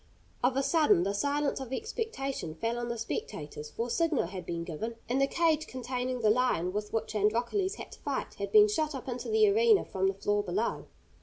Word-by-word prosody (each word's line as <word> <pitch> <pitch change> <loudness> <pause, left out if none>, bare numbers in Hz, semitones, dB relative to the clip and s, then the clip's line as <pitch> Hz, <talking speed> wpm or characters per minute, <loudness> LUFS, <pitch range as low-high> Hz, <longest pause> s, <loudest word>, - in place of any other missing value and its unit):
Of 255 +1 +2
a 275 - +2
sudden 300 - +4
the 200 +2 0
silence 285 +6 0
of 265 -2 -7
expectation 275 - -3
fell 230 +5 -2
on 240 0 -3
the 235 - -2
spectators, 150 -9 -5
for 225 +10 -3
a - - -6
signal 330 - +2
had 180 0 -7
been 170 -1 -3
given, 180 +8 -5
and 260 +3 +1
the 275 - +4
cage 315 0 +1
containing 255 0 -3
the 215 -1 +5
lion 215 -7 +1
with 210 0 -3
which 225 -1 -2
Androcles 235 - +1
had - - -9
to - - -12
fight - - -3
had - - -3
been 425 -1 +8
shot 310 -8 -1
up 265 - -7
into 250 - -4
the 435 -1 +5
arena 435 0 +4
from 190 0 0
the 195 - 0
floor 205 +1 +1
below. 205 +4 -2
245 Hz, 215 wpm, -30 LUFS, 205-300 Hz, -, been